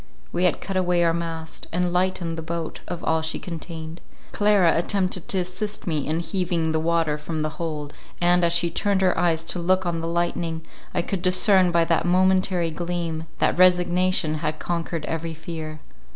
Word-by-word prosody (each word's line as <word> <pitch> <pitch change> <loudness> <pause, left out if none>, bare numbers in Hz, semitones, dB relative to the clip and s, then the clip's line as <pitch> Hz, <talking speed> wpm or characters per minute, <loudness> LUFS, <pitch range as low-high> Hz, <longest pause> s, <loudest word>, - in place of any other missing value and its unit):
We 180 - +1
had 180 - +1
cut 195 - -4
away 180 -2 +2
our 165 -1 +3
mast, 165 -1 -5
and 175 +1 0
lightened 180 -2 0
the 165 - -5
boat 165 0 -4
of 175 -2 -5
all 160 0 +1
she 160 0 -2
contained—Clara 170 +3 -1
attempted 185 0 0
to 195 - +1
assist 185 +4 -2
me 155 -5 -1
in 160 +2 0
heaving 170 -3 -1
the 160 - +1
water 160 -2 +1
from 155 +1 -4
the 155 0 -1
hold, 150 -3 -4 0.3
and, 175 0 +3
as 170 - +3
she 170 0 +2
turned 195 +2 +1
her 185 -1 +3
eyes 165 -1 +1
to 175 - -3
look 185 +2 +2
on 170 -1 -1
the 165 - -3
lightning, 170 -1 -1 0.3
I - - 0
could 195 -1 -3
discern 185 0 +4
by 170 -1 +3
that 165 +1 +1
momentary 185 -1 +2
gleam, 170 -1 -3
that - - +1
resignation 180 -2 +3
had 155 0 -2
conquered 170 -2 -3
every 165 0 -3
fear. 155 -1 -7
170 Hz, 180 wpm, -24 LUFS, 160-180 Hz, 0.3 s, discern